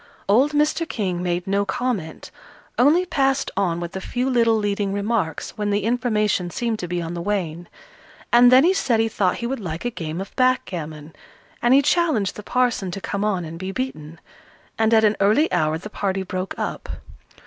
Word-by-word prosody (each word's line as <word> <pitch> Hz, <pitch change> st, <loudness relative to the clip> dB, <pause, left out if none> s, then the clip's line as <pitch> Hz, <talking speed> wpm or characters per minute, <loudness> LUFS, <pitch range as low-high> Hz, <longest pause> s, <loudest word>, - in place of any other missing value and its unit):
Old 260 Hz, +9 st, +3 dB
Mr. 305 Hz, +3 st, +1 dB
King 185 Hz, -5 st, -2 dB
made 175 Hz, 0 st, -1 dB
no 200 Hz, +1 st, +1 dB
comment, 235 Hz, -8 st, -3 dB, 0.5 s
only 310 Hz, +8 st, +4 dB
passed 275 Hz, -5 st, 0 dB
on 175 Hz, -4 st, 0 dB
with 175 Hz, +1 st, -6 dB
a 190 Hz, -, -4 dB
few 250 Hz, +6 st, -2 dB
little 230 Hz, -2 st, +3 dB
leading 205 Hz, -2 st, -1 dB
remarks 200 Hz, -5 st, -2 dB
when 210 Hz, 0 st, 0 dB
the 205 Hz, 0 st, 0 dB
information 215 Hz, -6 st, 0 dB
seemed 230 Hz, +3 st, -2 dB
to 180 Hz, -, -4 dB
be 175 Hz, 0 st, -2 dB
on 165 Hz, +1 st, -5 dB
the 170 Hz, -, -4 dB
wane. 175 Hz, -3 st, -3 dB, 0.6 s
And 245 Hz, +1 st, +7 dB
then 260 Hz, +2 st, +7 dB
he 360 Hz, +3 st, +4 dB
said 245 Hz, -11 st, +1 dB
he 225 Hz, -, +2 dB
thought 195 Hz, -4 st, 0 dB
he 235 Hz, -, -4 dB
would 265 Hz, +2 st, -2 dB
like 170 Hz, -1 st, -5 dB
a 245 Hz, -, 0 dB
game 160 Hz, -5 st, -5 dB
of 195 Hz, -, -7 dB
backgammon, 165 Hz, -, -1 dB, 0.5 s
and 240 Hz, +2 st, +5 dB
he 280 Hz, -, +5 dB
challenged 300 Hz, -, +1 dB
the -, -, -7 dB
parson 240 Hz, -4 st, 0 dB
to 180 Hz, -, -5 dB
come 200 Hz, +1 st, -3 dB
on 190 Hz, -5 st, 0 dB
and 165 Hz, +1 st, -8 dB
be 190 Hz, +1 st, -4 dB
beaten. 165 Hz, -, -5 dB, 0.6 s
And 220 Hz, 0 st, +2 dB
at 220 Hz, -1 st, +5 dB
an 215 Hz, 0 st, +3 dB
early 215 Hz, +11 st, +3 dB
hour 155 Hz, 0 st, +1 dB
the 180 Hz, -, -8 dB
party 195 Hz, -2 st, -2 dB
broke 185 Hz, 0 st, -4 dB
up. -, -, -4 dB
205 Hz, 195 wpm, -22 LUFS, 180-245 Hz, 0.6 s, And